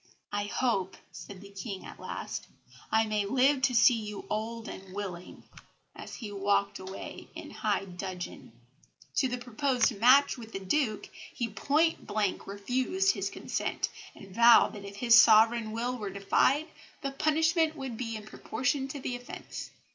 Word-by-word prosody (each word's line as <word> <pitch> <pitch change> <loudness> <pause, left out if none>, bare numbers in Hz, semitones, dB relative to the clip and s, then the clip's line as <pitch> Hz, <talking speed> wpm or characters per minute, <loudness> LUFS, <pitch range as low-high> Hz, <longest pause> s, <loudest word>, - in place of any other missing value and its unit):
"I 205 0 -1
hope," 200 -4 -1
said 195 -2 -10
the 200 0 -12
King 195 0 -6
at - - -11
last, - - -6 0.4
"I 220 0 +4
may 215 -1 0
live 265 +6 +3
to 255 -2 +2
see 235 +2 +7
you 210 -3 -5
old 225 +2 -3
and 190 0 -9
willing," 185 -3 -6 0.5
as - - -8
he 220 -4 -7
walked 200 0 0
away 190 +1 -8
in - - -8
high 195 - -1
dudgeon. 180 - -7 0.7
To 265 - +3
the 250 0 -3
proposed 245 -1 +1
match 260 +3 +5
with 225 -1 -10
the 195 - -3
Duke 215 +3 0 0.3
he 235 -2 -2
point 305 +10 +1
blank 205 -2 -1
refused 255 - +1
his - - -2
consent, - - -3 0.3
and 195 -1 -13
vowed 235 +2 +7
that 205 -2 -9
if 200 0 -9
his 235 +3 +2
sovereign 225 0 +6
will 240 +3 -2
were 210 -5 -5
defied, 200 +9 +2 0.4
the 275 - -1
punishment 320 +3 +2
would 265 -5 -5
be 230 -1 -4
in 215 -1 -7
proportion 265 +5 -2
to 280 +1 -6
the 255 -1 -3
offence. 245 0 -8
225 Hz, 160 wpm, -29 LUFS, 200-260 Hz, 0.7 s, see